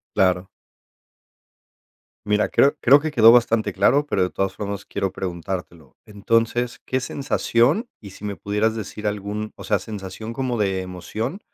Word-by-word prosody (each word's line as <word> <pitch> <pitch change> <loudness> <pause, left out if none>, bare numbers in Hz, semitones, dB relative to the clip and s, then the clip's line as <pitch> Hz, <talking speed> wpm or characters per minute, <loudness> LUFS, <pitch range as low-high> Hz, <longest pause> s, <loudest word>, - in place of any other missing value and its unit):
Claro. 90 0 +2 1.8
Mira, 105 0 +1
creo 140 +2 +3
creo 140 +4 +7
que 155 - -3
quedó 115 -6 +7
bastante 115 -4 +3
claro, 140 +10 +3
pero - - -1
de 90 - +2
todas 95 +1 -2
formas 100 -1 -5
quiero 95 -1 -2
preguntártelo. 85 -5 -6
Entonces, 115 +3 0
¿qué 130 - 0
sensación, 135 - +1
y 100 -3 -11
si 100 - -14
me 100 -1 -3
pudieras 105 +5 0
decir 105 0 -5
algún 105 +1 -3
o - - -11
sea, 105 -2 +1
sensación 105 +2 -7
como 125 -1 -2
de 95 -2 0
emoción, 105 - -5
105 Hz, 150 wpm, -22 LUFS, 95-120 Hz, 1.8 s, creo